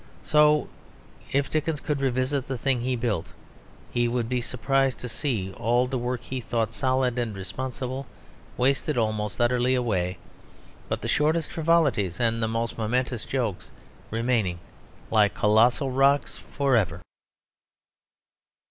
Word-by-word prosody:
So 150 0 +4 0.6
if 140 +1 +1
Dickens 155 -1 0
could 145 -2 -2
revisit 130 +1 0
the 130 - -3
thing 130 -1 +1
he 125 +1 0
built, 115 -8 -2 0.6
he 120 0 +1
would 120 -1 -1
be 125 0 -1
surprised 135 +2 0
to 125 - -4
see 115 -6 -2
all 120 +3 +2
the 130 0 -2
work 125 0 -2
he 130 -1 -5
thought 115 -2 -1
solid 130 -1 +1
and 115 -4 -2
responsible 130 +6 -5 0.5
wasted 135 +2 +1
almost 110 -2 -1
utterly 125 +1 +3
away, 95 -8 0 0.7
but - - -2
the - - -2
shortest 155 +2 +1
frivolities 155 - +2
and 115 -1 +1
the 110 - +1
most 115 +1 -2
momentary 125 +2 0
jokes 115 -5 -3 0.4
remaining 115 -6 0 0.5
like 105 -4 +4
colossal 120 +7 +3
rocks 140 +2 +3
for 140 -2 0
ever. 105 -7 +1
125 Hz, 135 wpm, -26 LUFS, 115-135 Hz, 0.7 s, So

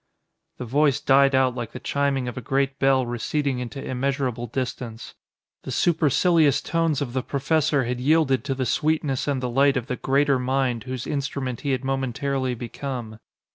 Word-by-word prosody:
The 125 - -5
Voice 140 +3 +2
died 135 0 +4
out 130 -1 +3
like 120 -2 -6
the 125 - -6
chiming 140 -2 0
of 125 - -5
a 125 - -5
great 135 +3 -1
bell 135 -1 +3
receding 125 +3 -1
into 125 +2 -6
immeasurable 130 -2 -2
distance. 120 -2 -5 0.5
The - - -9
supercilious 160 -2 +3
tones 165 -4 0
of 120 -3 -7
the 130 - 0
professor 145 +1 +1
had 125 +1 -3
yielded 135 -2 +2
to 135 -2 -1
the 130 -1 -1
sweetness 150 +2 0
and 135 -3 -1
the - - 0
light 135 +2 +3
of 120 - -2
the 125 -1 -4
Greater 140 0 +2
Mind 125 -2 0
whose 130 -2 -5
instrument 135 -3 -3
he 145 - -3
had 130 0 -1
momentarily 135 0 -1
become. 120 -2 -6
135 Hz, 175 wpm, -24 LUFS, 125-140 Hz, 0.5 s, died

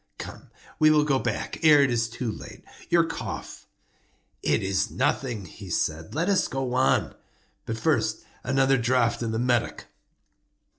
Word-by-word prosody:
Come, - - -9 0.3
we 155 - +6
will 150 -1 +5
go 140 -3 +1
back - - -3
ere 150 -3 +7
it 135 - +1
is 115 -1 0
too 115 0 -3
late. - - -10 0.3
Your 170 -1 +5
cough—" 165 - -6 0.7
"It - - +1
is 95 0 0
nothing," 120 -7 -1
he 95 +2 -11
said; 80 - -2
"let 165 +3 0
us 195 -2 +2
go 130 -2 -3
on. 130 +1 +2 0.5
But - - -3
first, - - 0 0.2
another 135 0 +3
draught 120 -1 +1
of 115 -1 -2
the 110 - -1
Medoc." 120 0 0
125 Hz, 155 wpm, -26 LUFS, 115-145 Hz, 0.7 s, ere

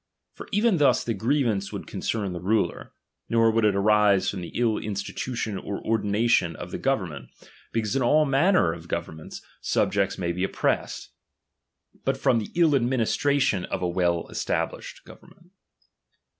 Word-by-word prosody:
For - - -11
even 210 -1 +3
thus 145 -3 +3
the 115 - -1
grievance 110 -2 0
would - - -6
concern 100 -5 -3
the 85 - -5
ruler; 105 +3 -1 0.4
nor 115 -1 +4
would 115 0 +1
it 105 -2 +3
arise 105 -1 +3
from 95 - -6
the 85 - -7
ill 115 -3 +1
institution 105 +1 -4
or 100 - -5
ordination 105 -4 +1
of 90 - -8
the - - -4
government, 90 - -2 0.4
because 110 +1 -1
in 135 - +1
all 150 +5 +4
manner 140 - +3
of 85 0 -11
governments 80 -2 -6 0.2
DOMINION. 100 - +1
129 95 -1 +3
jnli^scts - - -8
may 85 -2 -1
be 90 +2 -3
oppressed; - - -1 0.9
but 135 0 0
from 125 -3 +2
the 105 - -5
ill 170 -2 +4
admi 125 -4 +2
cHAP.al 115 - +2
nistration 140 -8 +1
of - - -4
a - - +1
well 85 -1 0
established - - -3
government. 175 +1 -17
110 Hz, 170 wpm, -25 LUFS, 95-130 Hz, 0.9 s, nor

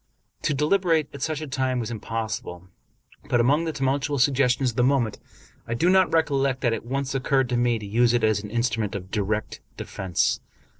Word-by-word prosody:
To 150 - 0
deliberate 160 +1 +2
at 140 - -9
such 155 0 -2
a 155 - -5
time 130 -2 -1
was 115 -1 -4
impossible; 110 -5 -5 0.6
but, 120 -3 +3
among 145 +7 +3
the 160 - -1
tumultuous 140 -1 +1
suggestions 130 -2 +2
of 110 - -16
the 125 - +3
moment, 125 -5 +1 0.5
I 115 - -2
do 170 +9 +3
not 190 -1 +4
recollect 140 -5 +1
that 120 -3 +2
it 115 - -4
once 135 +3 -3
occurred 135 -1 +1
to 125 - 0
me 120 -1 +2
to 105 - -8
use 115 +4 +3
it 120 - +1
as 110 -2 +2
an 105 - -8
instrument 115 -2 -1
of 95 -1 -7
direct 105 +1 -2 0.2
defense. 95 -3 -1
125 Hz, 195 wpm, -25 LUFS, 115-140 Hz, 0.6 s, not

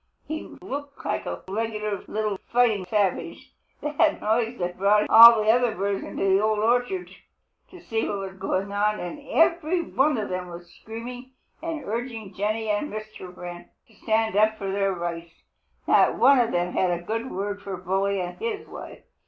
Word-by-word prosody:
He 315 0 -6
looked 285 +1 -7
like - - -2
a - - -5
regular 210 0 -3
little 210 -2 -2
fighting 230 -6 +3
savage. 200 -1 -1 0.3
The 295 - -3 0.3
noise 225 +2 0
had 180 0 -3
brought 210 +2 +3
all 230 -1 +10
the 215 - +5
other 240 -1 +2
birds 200 +1 -1
in - - -8
the 195 0 +2
Old 215 0 +1
Orchard 245 - 0 0.6
to 365 - -13
see 225 -7 -2
what 205 - -2
was 190 -1 -7
going 195 +1 -2
on, 210 +1 +1
and 175 +10 -6
every 335 +1 +2
one 285 -2 +1
of 215 - -3
them 185 0 -3
was 175 0 -11
screaming 245 +3 -9 0.3
and 325 -2 -4
urging 225 -2 -5
Jenny 215 +3 -2
and 210 +7 -1
Mr. 215 -3 -8
Wren 175 0 -8 0.2
to - - -22
stand 220 -1 0
up 215 +1 +3
for 195 -2 -4
their 195 0 +1
rights. 170 -1 -6 0.4
Not - - +4
one 275 -1 +6
of 240 -1 +2
them 175 0 -1
had 185 - +2
a 175 0 -2
good 225 +7 -3
word 205 +2 -4
for 195 -2 -5
Bully 195 +2 0
and 180 0 -6
his 450 -3 -3
wife. - - -10
215 Hz, 180 wpm, -25 LUFS, 195-240 Hz, 0.6 s, all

